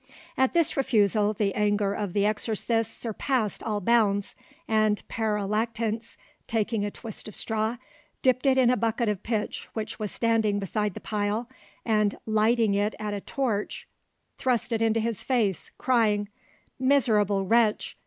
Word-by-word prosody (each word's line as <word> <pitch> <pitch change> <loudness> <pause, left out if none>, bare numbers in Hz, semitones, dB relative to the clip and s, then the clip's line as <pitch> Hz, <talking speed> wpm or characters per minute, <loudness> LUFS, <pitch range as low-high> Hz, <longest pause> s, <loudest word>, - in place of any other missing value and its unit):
At 265 +3 +1
this 335 -3 +3
refusal 210 -5 +2
the 200 -2 -1
anger 205 -1 +1
of 205 -4 -3
the 205 -1 +2
exorcists 225 +1 0
surpassed 230 -1 -2
all 210 -2 -2
bounds, 205 -2 +2 0.3
and 215 -1 +1
Pere 215 -2 -1
Lactance, 225 +1 -2 0.3
taking 220 -1 0
a 205 - -1
twist 220 0 -8
of 215 - -7
straw, 220 +1 -1 0.5
dipped 255 +1 +3
it 265 -1 +4
in 250 -2 +5
a 250 - +2
bucket 225 +1 0
of 205 -3 -2
pitch 220 -2 -3
which 220 +1 -5
was 210 -2 -3
standing 225 -3 +1
beside 205 0 -2
the - - -7
pile, 210 +2 -2 0.4
and 210 -2 +2
lighting 220 0 +2
it 205 +2 0
at 210 -1 -4
a 200 - -4
torch, 230 -6 -2 0.5
thrust 250 -2 0
it 225 -1 0
into 225 0 +2
his 225 -2 -2
face, 220 - 0
crying— 215 -5 +2 0.5
"Miserable 215 -7 +3
wretch! 225 +1 +2
220 Hz, 155 wpm, -27 LUFS, 205-230 Hz, 0.5 s, in